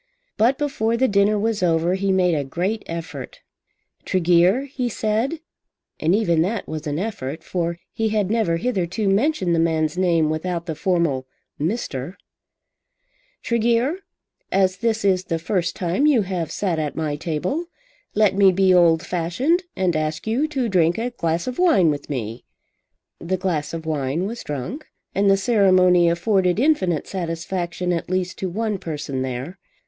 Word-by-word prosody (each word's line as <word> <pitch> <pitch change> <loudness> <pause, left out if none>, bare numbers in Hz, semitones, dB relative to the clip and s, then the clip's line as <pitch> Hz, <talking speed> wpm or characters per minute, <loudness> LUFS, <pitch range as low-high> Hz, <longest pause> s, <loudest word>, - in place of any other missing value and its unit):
But 245 +5 +3
before 235 -6 0
the 260 +2 +3
dinner 205 0 +3
was 215 0 -1
over 170 0 +2
he 195 +1 0
made 180 -2 +3
a 145 -3 0
great 180 +10 -2
effort. 165 0 -7 0.6
"Tregear," 180 +6 +3
he 260 -3 -3
said, 225 +9 -1 0.6
and 165 +4 +2
even 170 -7 +2
that 205 +6 -1
was 155 0 -5
an 145 0 -2
effort, 160 -7 -4
for 170 -1 -2 0.2
he 225 0 0
had 210 -2 0
never 220 -8 +1
hitherto 195 -1 -1
mentioned 195 - +2
the 165 - +2
man's 160 0 +1
name 165 -4 +2
without 170 +2 -3
the 165 - -3
formal 160 -6 0 0.3
Mister, 160 - -3 1.3
"Tregear, 235 +6 +1 0.5
as 190 -1 +2
this 220 0 -1
is 185 -1 +2
the 165 - -1
first 170 +1 -1
time 185 - +1
you 260 -8 +4
have 180 -4 -3
sat 180 -6 -1
at 150 -2 -3
my 155 -2 -2
table, 175 - -2 0.5
let 210 -1 +4
me 195 -1 +6
be 190 0 +3
old 170 -1 +4
fashioned, 245 - 0
and 180 -3 0
ask 155 0 -2
you 240 +8 +1
to 270 -5 -1
drink 175 -4 +2
a 240 +2 -2
glass 170 -7 -1
of 255 +3 -5
wine 305 - +4
with 145 -1 -6
me." 115 -4 -4 0.8
The 185 +2 -2
glass 175 -5 -2
of 165 -1 -6
wine 150 +2 -1
was 230 +4 -5
drunk 150 - -5 0.3
and 200 0 +2
the 195 - +5
ceremony 185 -5 +4
afforded 180 +2 +1
infinite 195 - +2
satisfaction 175 0 -3
at 170 - -3
least 185 0 -2
to 190 - -2
one 210 +1 -2
person 145 -5 -4
there. 130 +8 -5
185 Hz, 160 wpm, -22 LUFS, 165-215 Hz, 1.3 s, me